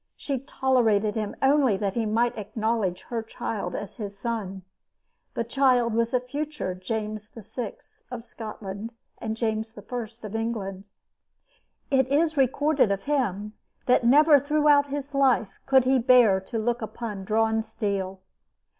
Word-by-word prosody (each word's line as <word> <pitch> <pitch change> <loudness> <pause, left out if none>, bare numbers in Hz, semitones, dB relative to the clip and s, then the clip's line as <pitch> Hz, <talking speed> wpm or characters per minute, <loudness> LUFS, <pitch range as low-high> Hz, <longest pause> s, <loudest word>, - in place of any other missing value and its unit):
She 275 -3 -3
tolerated 235 -6 +1
him 215 -2 -3
only 270 -6 +4
that 195 -1 -1
he 225 -1 -1
might 230 +3 +1
acknowledge 215 -3 -2
her 235 -2 -4
child 220 -1 -4
as 205 0 -6
his 205 -3 -6
son. 200 -4 -4 0.7
This 230 - -1
child 245 -2 +2
was 230 0 +1
the 250 - +1
future 285 -4 -4
James 215 +3 -4
VI. 235 - -6 0.4
of 245 -2 -6
Scotland 215 -1 -7 0.3
and 220 -1 -4
James 220 -1 -2
I. 235 +3 -5 0.2
of 210 - -8
England. 205 -4 -3 1.0
It 265 -2 +3
is 310 +4 +2
recorded 275 -1 +2
of 195 -1 -1
him 210 -8 -1 0.3
that 250 - +4
never 290 +4 +6
throughout 290 0 +3
his 285 0 -5
life 260 -7 +2
could 265 -1 +5
he 260 +1 +3
bear 240 -5 +5
to 190 +4 -5
look 235 +2 -1
upon 220 -2 -5
drawn 220 +2 +1
steel. 200 -3 -3
230 Hz, 145 wpm, -26 LUFS, 210-260 Hz, 1.0 s, never